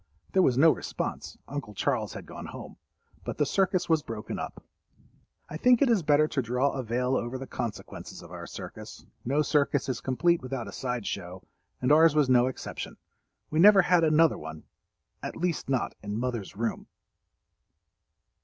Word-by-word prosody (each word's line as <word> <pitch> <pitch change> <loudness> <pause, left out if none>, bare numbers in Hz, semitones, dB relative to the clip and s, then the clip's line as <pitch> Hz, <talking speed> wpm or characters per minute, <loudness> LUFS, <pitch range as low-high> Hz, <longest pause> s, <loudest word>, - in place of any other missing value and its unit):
There 190 - +5
was 125 -8 +3
no 160 +4 +7
response—Uncle 140 -8 -5
Charles - - -1
had - - -8
gone - - -8
home. - - -9 0.5
But - - -5
the 150 - +2
circus 185 +3 +1
was 160 -3 +3
broken 110 -4 -6
up. - - -6 0.8
I 155 - -6
think 245 +6 +5
it 260 - +3
is 220 -5 +3
better 150 0 +4
to 140 - -1
draw 125 +3 +1
a 135 - -3
veil 125 +2 0
over 120 +1 -2
the 135 - -6
consequences 120 -5 -6
of - - -13
our - - -7
circus. - - -9 0.2
No 140 +5 +2
circus 145 -2 +1
is 130 - -2
complete 170 +6 +2
without 130 -2 -4
a - - -7
side 125 -4 -3
show—and 95 +7 -5
ours 160 0 +6
was 150 -3 +3
no 125 0 +5
exception. 130 - -6 0.5
We 155 - +1
never 195 +1 +8
had 180 -1 +4
another 160 0 +4
one—at 80 -1 -11
least 175 -5 -2
not 130 -2 0
in 105 0 -4
mother's 120 -6 -3
room. 115 +2 -3
135 Hz, 165 wpm, -28 LUFS, 120-160 Hz, 0.8 s, never